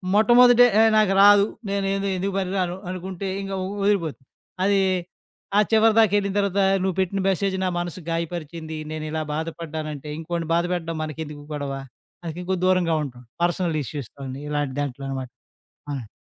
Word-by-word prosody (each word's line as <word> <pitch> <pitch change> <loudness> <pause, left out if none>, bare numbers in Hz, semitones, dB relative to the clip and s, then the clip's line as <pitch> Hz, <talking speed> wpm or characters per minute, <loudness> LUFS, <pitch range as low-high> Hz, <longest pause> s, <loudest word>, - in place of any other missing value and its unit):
మొట్టమొదట 240 +3 +7 0.2
ఏహ్! 225 - +6
నాకు 210 -3 +4
రాదు, 205 0 +7 0.2
నె 200 - -1
నేను 195 0 -1
ఎందుకు 195 +2 -2
పనికిరాను 185 -2 -1 0.2
అనుకుంటే, 185 +1 -5
ఇంక 195 0 -6
వ - - -2 0.2
వదిలిపోతుంది. 170 -10 0 0.4
అది 200 0 +3 0.8
ఆ - - +7
చివరి 220 0 +5
దాకెళ్ళిన 205 -2 +3
తర్వాత, 200 0 +1 0.2
నువ్వు 190 -2 0
పెట్టిన 190 +1 -1
మెసేజ్ 195 0 0
నా - - +1
మనసు 175 +1 -4
గాయపరిచింది, 165 -1 -4 0.2
నేను 155 0 -4
ఇలా 160 0 -1
బాధపడ్డానంటే 155 -2 -5
ఇంకోడిని 165 0 -4
బాధపెట్టడం 170 -1 -1
మనకెందుకు 150 -1 -6
గొడవ. 145 -2 -3 0.5
అందుకే 170 +1 -5
కొద్ది 185 -1 -1
దూరంగా 180 -3 +3
ఉంటాం. 125 -3 -8 0.2
పర్సనల్ 175 -2 0
ఇష్యూస్‌తోని 135 0 -7
ఇలాంటి 145 -2 -1
దాంట్లో 140 -1 -4
అనమాట. 130 -2 -4 0.6
అవునండి. 135 -6 -4
175 Hz, 150 wpm, -24 LUFS, 155-195 Hz, 0.8 s, మొట్టమొదట